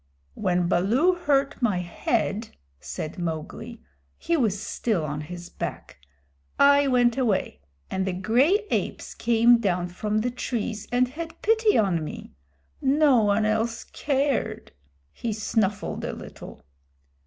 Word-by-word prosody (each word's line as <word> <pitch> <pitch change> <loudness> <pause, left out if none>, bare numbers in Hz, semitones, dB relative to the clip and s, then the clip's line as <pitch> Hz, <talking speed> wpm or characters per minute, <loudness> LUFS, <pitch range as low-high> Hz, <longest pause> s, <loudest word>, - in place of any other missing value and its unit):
"When 180 - 0
Baloo 230 - +3
hurt 280 -7 0
my 215 -7 +2
head," 210 +5 -1 0.3
said 75 - -6
Mowgli 175 +8 -5 0.3
(he 340 - 0
was 220 - +1
still 210 -5 -1
on 150 0 -4
his 175 +3 -8
back), - - -6 0.6
"I 280 0 +6
went 245 -1 +3
away, 225 -7 0 0.3
and 190 0 -1
the 190 - -1
gray 255 - +2
apes - - -2
came 235 +1 +4
down 180 -5 0
from 210 +4 -1
the 245 +2 -1
trees 225 -3 -3
and 250 +1 +3
had 325 +4 -7
pity 445 0 +3
on 185 -6 +2
me. 150 - -7 0.5
No 275 -2 +4
one 210 +1 +2
else 220 +2 0
cared." 270 -6 -1 0.4
He 235 - -3
snuffled 210 -1 -1
a - - -3
little. - - -10
225 Hz, 130 wpm, -25 LUFS, 190-265 Hz, 0.6 s, I